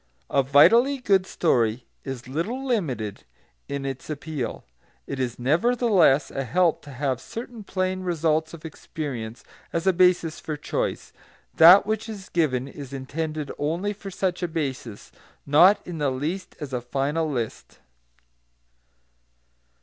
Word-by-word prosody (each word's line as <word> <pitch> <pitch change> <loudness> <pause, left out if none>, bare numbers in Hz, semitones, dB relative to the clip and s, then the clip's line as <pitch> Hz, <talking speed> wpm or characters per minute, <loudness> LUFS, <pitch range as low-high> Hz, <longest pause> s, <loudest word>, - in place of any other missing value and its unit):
A 140 - +4
vitally 230 - +5
good 195 -7 +2
story 120 -7 +1 0.2
is 130 -2 -6
little 205 - -3
limited 135 - -2 0.4
in 140 -1 -4
its 135 +1 -5
appeal. 150 -4 -4 0.4
It 140 - -5
is, 125 -2 -2
nevertheless, 175 - +3
a 135 - -3
help 170 +5 +2
to 145 - -10
have 130 -1 -2
certain 230 -1 -8
plain 185 -1 -2
results 160 -3 0
of 165 - -14
experience 130 -7 -6 0.3
as 165 +1 -2
a 190 - +4
basis 180 -3 +3
for 155 -2 -5
choice; 150 - -3 0.4
that 175 +5 +8
which 220 +1 -2
is 200 -3 -8
given 135 -6 0
is 140 -1 -9
intended 150 +2 -4
only 170 +8 -1
for 200 -1 -9
such 190 -1 -2
a 175 - 0
basis, 135 -9 -5 0.3
not 180 +8 +5
in 170 -3 -6
the 145 -2 +1
least 150 +9 -4
as 145 -4 -7
a 125 - -1
final 140 +6 -1
list. 120 -6 -5
155 Hz, 140 wpm, -25 LUFS, 135-185 Hz, 0.4 s, that